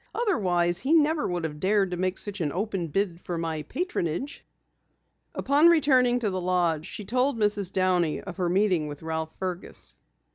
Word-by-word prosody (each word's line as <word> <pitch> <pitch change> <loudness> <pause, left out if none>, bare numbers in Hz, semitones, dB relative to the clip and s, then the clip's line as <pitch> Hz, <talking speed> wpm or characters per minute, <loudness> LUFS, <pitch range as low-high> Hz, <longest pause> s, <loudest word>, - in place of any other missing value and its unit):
"Otherwise, 180 - +1
he 275 +9 +2
never 310 0 +3
would 175 -1 -2
have 150 -2 -4
dared 195 0 +2
to - - -1
make 185 +1 -1
such 205 -2 -5
an 150 -3 0
open 195 -2 -2
bid 180 +1 -1
for 175 - -4
my 165 -2 -2
patronage." 270 - -3 0.9
Upon 290 +4 +4
returning 265 -7 +4
to 210 -4 0
the 185 0 -2
lodge 175 -3 0
she 210 - -7
told 250 +4 +1
Mrs. 205 -3 +2
Downey 180 -4 +1
of 195 -2 -9
her 180 -2 0
meeting 180 -4 +2
with 145 +1 -8
Ralph 160 0 -4
Fergus. 185 -1 -5
185 Hz, 175 wpm, -26 LUFS, 170-225 Hz, 0.9 s, Upon